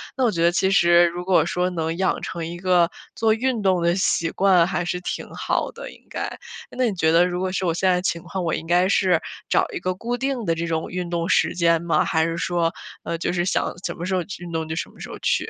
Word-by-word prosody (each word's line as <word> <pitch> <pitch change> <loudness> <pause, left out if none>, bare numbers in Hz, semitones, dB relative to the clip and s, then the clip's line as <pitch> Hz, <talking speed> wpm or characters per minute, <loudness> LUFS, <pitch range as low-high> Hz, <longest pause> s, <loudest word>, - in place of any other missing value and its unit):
那 265 - 0
我 235 - +3
觉 170 - -2
得 170 +1 +5
其 190 +2 +1
实 175 -2 +6
如 175 +1 -5
果 180 -4 +4
说 180 +1 0
能 165 -2 -2
养 190 0 0
成 170 -2 -4
一 170 +1 -6
个 175 -2 +3 0.3
做 225 -1 +3
运 240 0 -1
动 185 -3 +2
的 170 0 +2
习 170 -3 +1
惯 185 -3 +4
还 180 -1 -2
是 180 +1 -2
挺 - - -4
好 - - -1
的， - - -9
应 - - -18
该。 - - -3 0.4
那 255 - 0
你 215 -5 -1
觉 160 -2 +2
得 170 +2 +5
如 180 0 -3
果 185 0 -1
是 190 0 -2
我 170 - +1
现 185 +3 +1
在 180 0 +1
情 170 -2 -1
况， 190 - -4
我 165 - 0
应 160 - -6
该 175 +2 +3
是 185 -4 +3 0.3
找 - - +3
一 - - -3
个 185 0 -1
固 235 +6 -3
定 265 -2 -2
的 165 - +1
这 165 +1 -2
种 160 -1 -2
运 180 -1 -4
动 170 -1 -1
时 - - +2
间 170 -1 +2
吗？ 170 -1 +1
还 160 0 +1
是 165 0 -2
说， 170 -1 0 0.3
呃， 170 - -3
就 170 - -2
是 175 -1 0
想 - - 0
什 - - -2
么 175 - -5
时 185 +1 -1
候 185 - +1 0.2
运 175 -1 -8
动 160 0 -1
就 - - -2
什 170 - -3
么 - - -20
时 - - -7
候 - - -7
去？ - - 0
175 Hz, 290 characters per minute, -23 LUFS, 170-190 Hz, 0.4 s, 实